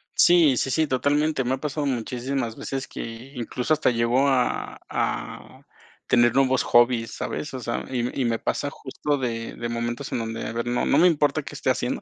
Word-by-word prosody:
Sí, 165 Hz, -7 st, +5 dB
sí, 135 Hz, -, 0 dB
sí, 155 Hz, +2 st, +2 dB
totalmente. 145 Hz, +2 st, +1 dB
Me 125 Hz, +1 st, 0 dB
ha -, -, -9 dB
pasado 150 Hz, +1 st, -3 dB
muchísimas 125 Hz, -1 st, -2 dB
veces 135 Hz, -1 st, -4 dB
que, 115 Hz, +4 st, -8 dB
incluso, 125 Hz, +4 st, -1 dB
hasta 155 Hz, -, +2 dB
llego 120 Hz, +3 st, +2 dB
a 130 Hz, -3 st, 0 dB
a -, -, -4 dB, 0.5 s
tener 120 Hz, -1 st, +4 dB
nuevos 130 Hz, -1 st, +3 dB
hobbies, 120 Hz, -1 st, +3 dB
¿sabes? 150 Hz, -, -5 dB
O 130 Hz, -, -4 dB
sea, 120 Hz, 0 st, -3 dB
y 125 Hz, +1 st, -2 dB
y -, -, +1 dB
me 115 Hz, -1 st, +1 dB
pasa 145 Hz, -, -2 dB
justo 145 Hz, +1 st, -3 dB
de 115 Hz, -3 st, -3 dB
de 120 Hz, -, -4 dB
momentos 120 Hz, 0 st, -3 dB
en -, -, -1 dB
donde, 115 Hz, 0 st, -4 dB
a -, -, -3 dB
ver, 115 Hz, +1 st, -3 dB
no 120 Hz, 0 st, 0 dB
no 140 Hz, -, +3 dB
me 175 Hz, -, +7 dB
importa 150 Hz, -4 st, +2 dB
qué -, -, -9 dB
esté -, -, -1 dB
haciendo, -, -, -1 dB
130 Hz, 200 wpm, -24 LUFS, 120-140 Hz, 0.5 s, me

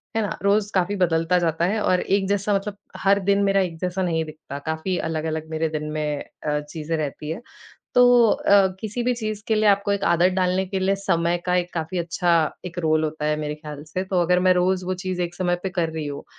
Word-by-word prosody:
है 225 Hz, -, +2 dB
ना? 205 Hz, -, -3 dB
रोज 205 Hz, +1 st, +2 dB
काफ़ी 185 Hz, +2 st, +1 dB
बदलता 175 Hz, -1 st, +2 dB
जाता 165 Hz, -1 st, +1 dB
है 210 Hz, +4 st, 0 dB
और 185 Hz, -2 st, +2 dB
एक 195 Hz, 0 st, +1 dB
जैसा 205 Hz, +1 st, 0 dB
मतलब 205 Hz, +1 st, -3 dB, 0.2 s
हर 200 Hz, +1 st, +3 dB
दिन 200 Hz, +1 st, +3 dB
मेरा 195 Hz, 0 st, +3 dB
एक 175 Hz, -3 st, -3 dB
जैसा 180 Hz, +1 st, -2 dB
नहीं 165 Hz, -2 st, 0 dB
दिखता। 155 Hz, -2 st, -9 dB
काफ़ी 160 Hz, +4 st, -2 dB
अलग-अलग 160 Hz, 0 st, -3 dB
मेरे 160 Hz, 0 st, -1 dB
दिन 155 Hz, -1 st, -3 dB
में 150 Hz, -1 st, -2 dB, 0.2 s
अ, 150 Hz, 0 st, +1 dB
चीजें 150 Hz, +2 st, -4 dB
रहती 150 Hz, 0 st, -4 dB
हैं। 185 Hz, -, -5 dB, 0.5 s
तो 250 Hz, -, +7 dB, 0.3 s
अ, 200 Hz, -1 st, +4 dB
किसी 220 Hz, +3 st, -3 dB
भी 250 Hz, +1 st, +1 dB
चीज़ 215 Hz, -3 st, -4 dB
के 220 Hz, -, +3 dB
लिए 215 Hz, -1 st, +3 dB
आपको 200 Hz, 0 st, +3 dB
एक 200 Hz, -1 st, -1 dB
आदत 175 Hz, +2 st, +3 dB
डालने 185 Hz, 0 st, +1 dB
के 190 Hz, +1 st, -2 dB
लिए 195 Hz, +1 st, +2 dB
समय 170 Hz, +1 st, +2 dB
का 180 Hz, -, +2 dB
एक 180 Hz, 0 st, -1 dB
काफ़ी 165 Hz, +2 st, -3 dB
अच्छा 170 Hz, +1 st, +1 dB, 0.3 s
एक 180 Hz, -1 st, -7 dB
रोल 155 Hz, -2 st, +2 dB
होता 155 Hz, -1 st, -3 dB
है, 150 Hz, 0 st, +1 dB
मेरे 150 Hz, 0 st, -3 dB
ख़्याल 150 Hz, -1 st, -9 dB
से, 175 Hz, +4 st, -4 dB
तो 185 Hz, -1 st, 0 dB
अगर 180 Hz, +1 st, +3 dB
मैं 185 Hz, 0 st, +5 dB
रोज़ 180 Hz, +1 st, +1 dB
वो 185 Hz, +1 st, -1 dB
चीज़ 185 Hz, -1 st, -4 dB
एक 175 Hz, 0 st, -4 dB
समय 175 Hz, -1 st, 0 dB
पे 190 Hz, -, -1 dB
कर 175 Hz, -3 st, 0 dB
रही 160 Hz, -2 st, -4 dB
हूँ, 140 Hz, -1 st, -6 dB
180 Hz, 235 wpm, -23 LUFS, 160-195 Hz, 0.5 s, तो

